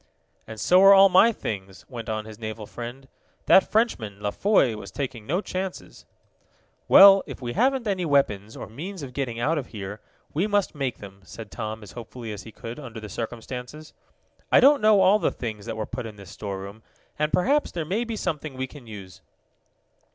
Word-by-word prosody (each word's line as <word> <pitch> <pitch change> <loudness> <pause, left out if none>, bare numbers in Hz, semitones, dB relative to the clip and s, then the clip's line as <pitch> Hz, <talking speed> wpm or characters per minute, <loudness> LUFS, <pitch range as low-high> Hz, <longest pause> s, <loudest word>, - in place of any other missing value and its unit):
"And 110 -1 -9
so 180 +1 +5
are 195 0 +9
all 195 0 +8
my 190 +5 +6
things," 95 - -6
went 120 -4 -7
on 110 -1 -3
his 110 0 -11
naval 110 -1 -6
friend. 120 +5 -8 0.4
"That 190 - +5
Frenchman, 115 - 0
La 105 0 -2
Foy, 190 - +2
was 100 -3 -9
taking 120 0 -5
no 175 +7 0
chances." 185 -2 -6 0.8
"Well, 195 0 +9
if - - -8
we 120 -2 -5
haven't 260 +1 +1
any 195 -3 -1
weapons, 115 - 0
or - - -6
means 170 - -8
of 130 -2 -8
getting 120 -4 -3
out 150 +6 +1
of 130 - -7
here, 100 -1 -7 0.3
we 175 +8 0
must 205 -2 0
make 135 -5 -3
them," 100 -1 -12
said 110 +1 -10
Tom, 110 0 -5
as 100 - -11
hopefully 115 +1 -8
as 100 - -7
he 110 - -12
could 115 +5 -8
under 120 -6 -8
the 105 -1 -9
circumstances. 125 +7 -7 0.6
"I - - +7
don't 280 +2 +6
know 215 -2 +5
all 190 +3 +5
the - - +1
things 110 -3 -6
that 115 -1 -4
were 110 - -2
put 120 +1 -6
in 110 - -10
this 100 -3 -12
storeroom, 100 +1 -7 0.4
and 150 0 0
perhaps 285 +11 +2
there 165 -3 -4
may 200 +9 -1
be 230 -1 -4
something 155 -8 -4
we 130 - -2
can 130 -2 -14
use." 95 -4 -11
125 Hz, 200 wpm, -25 LUFS, -, 0.8 s, are